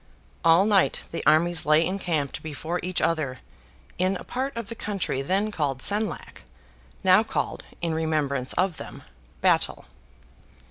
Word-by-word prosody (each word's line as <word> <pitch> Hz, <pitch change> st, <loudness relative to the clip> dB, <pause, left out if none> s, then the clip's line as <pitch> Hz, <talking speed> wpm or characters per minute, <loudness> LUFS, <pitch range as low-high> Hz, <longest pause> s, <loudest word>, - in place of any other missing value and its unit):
All 165 Hz, +3 st, +6 dB
night 205 Hz, -3 st, +2 dB
the 165 Hz, -, -4 dB
armies 165 Hz, +2 st, +4 dB
lay 155 Hz, +2 st, +4 dB
encamped 170 Hz, -7 st, -2 dB
before 160 Hz, +3 st, -4 dB
each 185 Hz, 0 st, -2 dB
other, 155 Hz, -6 st, 0 dB, 0.6 s
in 185 Hz, +2 st, +2 dB
a -, -, -9 dB
part 260 Hz, 0 st, -3 dB
of 235 Hz, -3 st, -4 dB
the 230 Hz, -, -5 dB
country 200 Hz, -11 st, -2 dB
then 195 Hz, +9 st, 0 dB
called 145 Hz, -8 st, -1 dB
Senlac, 205 Hz, +8 st, -1 dB, 0.6 s
now 185 Hz, +2 st, +6 dB
called 220 Hz, -, -3 dB, 0.2 s
(in 170 Hz, -1 st, -1 dB
remembrance 150 Hz, -5 st, 0 dB
of 180 Hz, -2 st, 0 dB
them) -, -, -9 dB, 0.4 s
Battle. -, -, +2 dB
170 Hz, 140 wpm, -25 LUFS, 155-195 Hz, 0.6 s, All